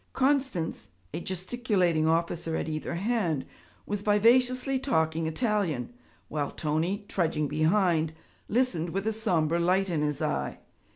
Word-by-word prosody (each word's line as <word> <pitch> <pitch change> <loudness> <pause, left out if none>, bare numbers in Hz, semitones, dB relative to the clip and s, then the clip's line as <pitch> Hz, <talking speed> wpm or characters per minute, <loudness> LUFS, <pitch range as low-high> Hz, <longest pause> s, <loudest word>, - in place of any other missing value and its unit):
Constance, 260 - 0 0.2
a - - -2
gesticulating 185 -3 0
officer 165 0 0
at - - -2
either 155 +2 -3
hand, 185 - 0 0.4
was 205 -1 -3
vivaciously 250 +6 +3
talking 160 - +1
Italian, 195 - -1 0.3
while 145 -2 -2
Tony, 170 +7 -1
trudging 160 -4 0
behind, 160 +1 +2 0.4
listened 215 -8 +1
with 195 +4 -3
a 220 - +1
sombre 170 -7 +1
light 185 +2 +2
in 155 -3 0
his 150 -1 0
eye. - - -1
175 Hz, 125 wpm, -28 LUFS, 160-215 Hz, 0.4 s, vivaciously